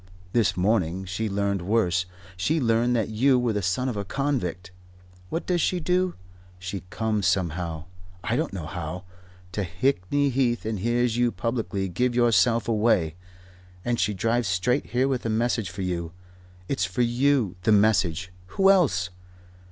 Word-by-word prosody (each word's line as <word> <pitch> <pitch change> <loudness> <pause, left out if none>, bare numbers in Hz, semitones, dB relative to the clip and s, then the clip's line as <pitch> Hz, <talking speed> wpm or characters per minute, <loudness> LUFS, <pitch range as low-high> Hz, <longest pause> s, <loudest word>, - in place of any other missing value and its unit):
This 105 -6 +2
morning 95 -2 +1
she 95 +4 -3
learned 100 -1 0
worse. 90 -3 +1 0.3
She 150 - 0
learned 120 -1 +2
that 110 -3 0
you 125 +5 +3
were 120 -2 +1
the 105 - -1
son 95 +8 0
of 125 - -2
a 100 - -2
convict. 95 - -2 0.6
What 165 - -3
does 175 -2 +1
she 180 - +1
do? 180 +2 +1 0.4
She 90 +2 -5
comes 110 -2 0
somehow 85 -3 -1 0.4
I 120 - 0
don't 155 +3 -1
know 90 -5 -5
how 85 +1 -5 0.5
to 105 - -2
Hickney 130 +8 0
Heath 120 -3 0
and 110 -2 -2
hears 120 +2 +1
you 120 -1 +2
publicly 115 -6 -2
give 120 +7 0
yourself 115 -1 +3
away 105 -8 +2 0.7
and 120 -1 0
she 105 - +1
drives 115 +4 0
straight 95 +10 0
here 125 +2 +1
with 130 -3 -1
a 115 - -2
message 115 -2 0
for 95 +2 -5
you. 85 -2 -3 0.5
It's 90 - -1
for 95 +6 0
you, 120 -4 +2
the 100 - +2
message. 95 -4 +2 0.3
Who 195 0 +6
else?" 95 - +2
110 Hz, 160 wpm, -25 LUFS, 90-125 Hz, 0.7 s, Who